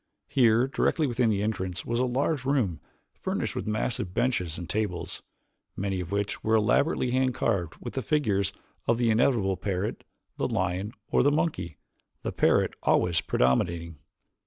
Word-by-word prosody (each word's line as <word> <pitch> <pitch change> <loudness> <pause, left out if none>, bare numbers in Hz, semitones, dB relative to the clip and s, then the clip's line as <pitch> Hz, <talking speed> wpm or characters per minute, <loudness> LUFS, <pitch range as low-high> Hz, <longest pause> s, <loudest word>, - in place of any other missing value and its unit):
Here, 120 -1 +4
directly 155 +3 +1
within 120 -3 +1
the 100 -2 +1
entrance 95 -5 -2
was 120 0 -1
a 130 - +3
large 135 +3 0
room 130 - 0 0.3
furnished - - -3
with - - -3
massive 105 -3 -2
benches 90 -10 0
and 85 - -6
tables, 90 -6 -2 0.6
many 95 -1 -1
of 85 -2 -5
which 100 0 -2
were 110 0 +3
elaborately 120 +4 +2
hand 130 -1 +1
carved 95 -10 0
with 120 - -7
the 130 - -1
figures 105 - +1 0.4
of 115 - +3
the 120 -2 +2
inevitable 110 -5 +2
parrot, 95 +1 -2 0.3
the - - 0
lion, 95 +4 -1 0.2
or - - +4
the 145 - +4
monkey, 150 - -1 0.5
the - - -2
parrot - - +3
always 85 -2 +2
predominating. 80 +5 0
110 Hz, 160 wpm, -27 LUFS, 90-125 Hz, 0.6 s, Here